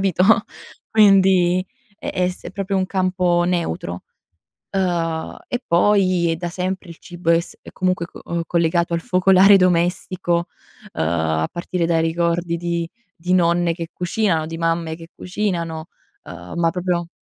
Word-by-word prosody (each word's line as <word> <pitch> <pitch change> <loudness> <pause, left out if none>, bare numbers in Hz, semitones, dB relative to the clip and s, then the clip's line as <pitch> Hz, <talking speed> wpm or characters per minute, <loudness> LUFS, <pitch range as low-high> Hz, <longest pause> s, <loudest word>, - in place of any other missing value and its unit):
capito? 185 -2 +1 0.7
Quindi 190 -3 +4 0.3
è - - -4
è 180 -1 +1
s 180 - -8
è 175 - -7
proprio 195 0 -2
un 185 0 +1
campo 185 -2 +1
neutro. 125 - -2 0.7
Uhm, 170 -4 -1
e 245 - -3
poi, 180 -1 +3
è - - -2
da 175 +1 -4
sempre 185 0 -4
il 165 - -11
cibo 175 -2 -3
è 165 0 +5
s - - -11
è - - -12
comunque 185 -2 0
c - - -13 0.3
collegato 170 0 +1
al 170 - 0
focolare 190 +3 +5
domestico, 175 -1 +1 0.4
uhm, - - -6
a 80 -1 0
partire 175 0 -2
dai 165 -1 +2
ricordi 170 +1 0
di 170 0 -2 0.3
di 180 +2 -3
nonne 170 -1 +3
che 165 -1 -6
cucinano, 180 -2 0
di 165 +1 -6
mamme 165 -1 -1
che 165 0 -12
cucinano, 170 -4 -3 0.4
uhm, 85 +1 -10
ma 165 - +3
proprio 175 -1 -2
175 Hz, 155 wpm, -20 LUFS, 165-185 Hz, 0.7 s, è